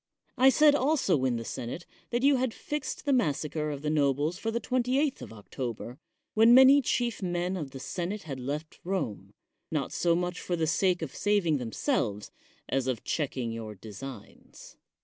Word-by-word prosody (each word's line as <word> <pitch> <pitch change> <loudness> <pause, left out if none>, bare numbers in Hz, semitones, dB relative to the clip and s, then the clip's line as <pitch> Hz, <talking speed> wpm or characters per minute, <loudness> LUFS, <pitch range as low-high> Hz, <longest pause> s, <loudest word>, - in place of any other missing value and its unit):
I 260 +1 +6
said 300 +2 +6
also 260 - +2
in 125 -2 +1
the 115 0 -4
senate 130 +9 -5 0.2
that 240 +1 -1
you 280 -1 +5
had 255 -2 -1
fixed 295 +1 -5
the 285 - +2
massacre 150 - 0
of 145 -1 -5
the 150 - 0
nobles 145 +3 +1
for 225 - -2
the 230 +1 -1
28th 255 +4 0
of - - -8
October 120 +3 -6 0.3
when 225 +2 +7
many 265 +2 +8
chief 240 -3 -1
men 180 0 -1
of 155 -7 -4
the 135 0 -9
senate 185 +8 -4
had 140 -4 -6
left 150 +5 -5
Rome, 105 - -3 0.3
not 150 -4 -2
so 170 -1 +2
much 180 +1 -2
for 175 - -2
the 165 -2 0
sake 175 +2 +1
of 140 - -6
saving 195 -8 +2
themselves 115 - -2 0.4
as 135 -1 0
of 125 -4 -2
checking 130 -6 -2
your 110 -2 -6
designs. 110 +4 -11
160 Hz, 175 wpm, -29 LUFS, -, 0.4 s, many